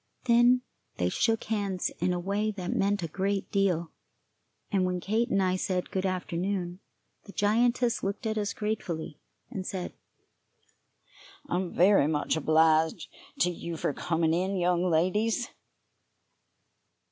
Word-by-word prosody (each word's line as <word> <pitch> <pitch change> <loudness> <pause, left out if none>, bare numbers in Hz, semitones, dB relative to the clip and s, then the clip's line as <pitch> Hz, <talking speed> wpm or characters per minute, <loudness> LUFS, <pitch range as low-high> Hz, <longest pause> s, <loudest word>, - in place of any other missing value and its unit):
Then 245 +1 +5 0.3
they 90 0 +1
shook 225 - +1
hands 200 -4 -1
in 185 - +1
a 180 - -1
way 200 +4 -1
that 190 -4 -3
meant 200 -1 +1
a - - -1
great 195 +4 -2
deal, 180 -5 +1 0.8
and 195 -3 +2
when 180 0 0
Kate 220 +7 0
and 195 -3 +2
I 185 0 +2
said 180 -1 -2
good 190 0 0
afternoon, 180 0 -2 0.5
the 200 - -10
giantess 235 +3 +2
looked 200 +3 -3
at 220 0 0
us 205 -2 -1
gratefully, 180 -8 -4 0.3
and 190 - -4
said: 185 -1 -5 1.5
"I'm 180 -4 -1
very 185 -4 +5
much 150 0 0
obliged 160 +1 +3 0.3
to 180 - +4
you 170 -1 -6
for 145 - -1
coming 165 0 0
in, 185 +3 0
young 175 0 +2
ladies." 210 +9 +1
185 Hz, 135 wpm, -28 LUFS, 175-205 Hz, 1.5 s, Then